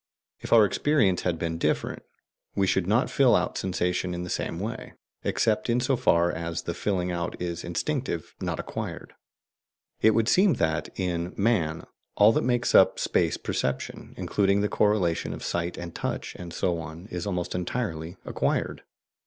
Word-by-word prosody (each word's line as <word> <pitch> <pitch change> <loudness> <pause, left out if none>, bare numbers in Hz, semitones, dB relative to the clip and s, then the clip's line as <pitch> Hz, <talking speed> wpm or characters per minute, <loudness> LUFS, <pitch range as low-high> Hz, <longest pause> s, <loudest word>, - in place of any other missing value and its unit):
If - - -8
our 115 -2 +8
experience 105 -5 +2
had 85 -2 0
been 80 0 -3
different, - - -1 0.5
we 100 - +2
should 95 -1 +1
not 110 +6 +3
fill 135 -3 +5
out 90 - 0
sensation 90 -1 -1
in 90 - -4
the 90 - -5
same 85 - -2
way, 110 +4 -5 0.3
except 110 +1 +1
in 120 +1 +3
so 130 +2 +2
far 85 -7 +3
as 85 0 -4
the 85 - -3
filling 90 -1 -1
out 85 0 -3
is 85 -1 -3
instinctive, 85 - -2
not - - -2
acquired. - - -5 0.9
It 110 -1 +5
would 115 -1 +2
seem 185 +2 +4
that, 80 -4 0
in 90 -1 -2
man, 90 -8 +1 0.3
all 105 +2 +7
that - - +1
makes 120 -1 +1
up - - +6
space - - +1
perception, 65 0 -3
including 100 0 +2
the 105 - +1
correlation 100 -6 +1
of - - -8
sight 85 0 -2
and 85 -1 -6
touch - - -3
and 90 -1 -8
so 85 0 0
on, 80 +2 -8
is 90 +2 -4
almost 90 -3 -2
entirely 90 -3 -3
acquired. - - -1
90 Hz, 170 wpm, -27 LUFS, 85-110 Hz, 0.9 s, our